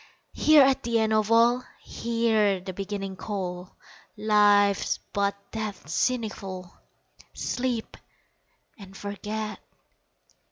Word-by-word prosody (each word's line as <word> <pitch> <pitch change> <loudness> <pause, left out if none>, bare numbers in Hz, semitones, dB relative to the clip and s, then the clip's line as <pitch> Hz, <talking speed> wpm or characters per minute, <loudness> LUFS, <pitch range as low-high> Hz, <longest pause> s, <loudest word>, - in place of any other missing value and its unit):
Here 305 -2 +6
at 270 0 +3
the 235 -1 0
end 220 -1 +2
of 215 0 +1
all 235 +2 +4 0.2
Hear 225 -4 +1
the 185 +1 -7
Beginning 195 0 -5
call, 185 -2 -5 0.4
Life's 205 -2 +3 0.2
but 200 0 +1 0.2
death's 210 -8 -5
seneschal 195 -7 -2 0.6
Sleep 245 -3 -2 0.8
and 195 -1 -12
forget! 210 +1 -5
210 Hz, 95 wpm, -26 LUFS, 195-230 Hz, 0.8 s, Here